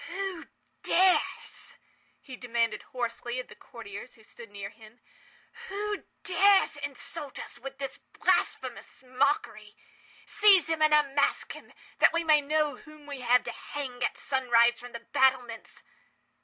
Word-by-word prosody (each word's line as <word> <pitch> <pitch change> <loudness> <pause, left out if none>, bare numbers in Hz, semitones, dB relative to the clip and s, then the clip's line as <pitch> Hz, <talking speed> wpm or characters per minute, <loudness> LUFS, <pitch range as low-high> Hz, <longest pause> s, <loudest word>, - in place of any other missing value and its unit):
"Who 385 -3 -5 0.3
dares,"—he 360 -6 -1
demanded 235 -2 -1
hoarsely 240 -1 -4
of 255 - -7
the - - -12
courtiers 230 0 -10
who 220 - -20
stood 230 +1 -12
near 200 0 -7
him—"who 400 - -9 0.2
dares 395 -2 +4
insult 290 +1 -5
us - - -8
with 270 +1 -8
this 275 -1 -6 0.2
blasphemous - - -1
mockery? 255 -5 -1 0.5
Seize 405 -5 +5
him 325 -1 -1
and 310 0 +5
unmask 285 -2 +2
him—that - - -1
we 335 0 +1
may 310 -2 +5
know 300 +1 0
whom 305 -1 -15
we 285 -3 -7
have 250 +1 +4
to - - -5
hang, 255 -4 -6
at - - -1
sunrise, 240 -3 +3
from 245 0 -11
the 235 - -7
battlements!" 250 -4 +1
270 Hz, 130 wpm, -28 LUFS, 240-310 Hz, 0.5 s, Seize